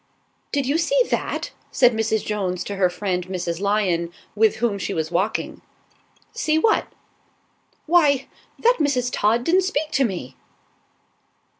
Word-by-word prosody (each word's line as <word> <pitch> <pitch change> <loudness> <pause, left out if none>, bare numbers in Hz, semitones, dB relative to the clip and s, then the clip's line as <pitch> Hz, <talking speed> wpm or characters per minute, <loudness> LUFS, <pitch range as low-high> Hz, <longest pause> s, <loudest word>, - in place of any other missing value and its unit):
"DID 280 -2 0
you 285 +5 +1
see - - +2
that?" - - -2 0.2
said 245 -2 +4
Mrs. 220 -1 0
Jones 185 -4 -2
to 200 - -5
her 185 -2 +3
friend 180 -1 -3
Mrs. 175 -2 -3
Lion, 190 -4 0 0.2
with 220 +1 +3
whom 220 -3 -1
she 195 - -3
was 160 0 -2
walking. 190 +5 -1 0.7
"See 310 0 +1
what?" 435 +7 +2 1.0
"Why, 295 -5 +3 0.3
that 485 +2 +3
Mrs. 255 -5 +1
Todd 225 +3 +2
didn't 360 +7 +3
speak 315 -5 -2
to 270 - +2
me." 175 - -4
220 Hz, 140 wpm, -22 LUFS, 185-285 Hz, 1.0 s, said